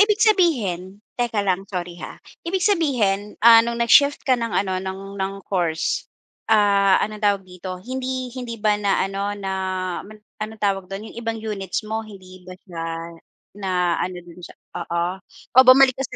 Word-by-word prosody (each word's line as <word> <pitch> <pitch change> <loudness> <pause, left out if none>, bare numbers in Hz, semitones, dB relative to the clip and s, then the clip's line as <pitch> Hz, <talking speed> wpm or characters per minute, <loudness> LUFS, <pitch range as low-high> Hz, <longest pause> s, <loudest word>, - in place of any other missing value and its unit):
ibig 420 0 +5
sabihin, 225 - +1
teka 230 -4 -1
lang, 195 0 -1
sorry 175 -2 -5
ha. - - -8 0.2
Ibig 365 +2 -2
sabihin, 235 - +1
ah, 230 -1 +10
no'ng 235 +1 -2
nag-shift 285 +4 +5
ka 265 - +3
ng 235 -2 +1
ano 190 -2 0
ng 195 +1 -7
ng 195 +1 -2
course, 170 -4 -1 0.4
ah, 200 -3 +4
anong 215 0 -7
tawag 200 -2 +1
dito, 185 0 -8
hindi 255 0 -4
hindi 245 -2 -6
ba 210 -1 +1
naano 200 0 0
na 195 -1 -4 0.5
man 215 +2 -12 0.2
anong 220 +1 -5
tawag 195 -2 0
do'n, 200 +3 -7
'yong 235 - -8
ibang 225 -1 -3
units 215 -1 -4
mo 220 +1 -3
hindi 185 -4 -13
ba 185 - -9
siya 170 -4 -6 0.8
naano 180 -1 0
do'n 175 +1 -14
sa - - -11 0.2
oo, 170 0 -1 0.5
o 260 - +8
bumalik 260 0 +8
ka 270 - 0
205 Hz, 165 wpm, -22 LUFS, 190-235 Hz, 0.8 s, ah